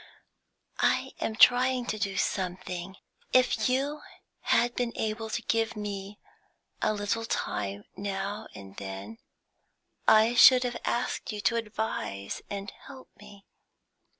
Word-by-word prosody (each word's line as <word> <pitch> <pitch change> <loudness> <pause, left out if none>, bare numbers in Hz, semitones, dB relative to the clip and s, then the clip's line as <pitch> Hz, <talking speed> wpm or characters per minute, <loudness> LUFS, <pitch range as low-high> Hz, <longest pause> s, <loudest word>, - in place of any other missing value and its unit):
"I - - +2
am 220 - -1
trying 250 +1 +5
to 215 - -3
do 195 -1 -2
something. 185 0 -3 0.4
If 255 0 +3
you 280 +4 0 0.4
had 240 0 +2
been 245 -1 -1
able 220 +1 -3
to 235 +1 -3
give 225 +1 0
me 205 -1 -5 0.6
a - - +2
little 210 +2 -1
time 100 - -3
now 200 +2 -4
and 95 -1 -11
then, 100 +3 -7 0.9
I 220 +2 +6
should 250 +1 +8
have 245 -1 -2
asked 240 - -1
you 210 - -5
to 205 +4 +2
advise 215 - -3
and 200 0 -5
help 265 -2 -14
me. 205 -1 -15
210 Hz, 125 wpm, -28 LUFS, 195-235 Hz, 0.9 s, should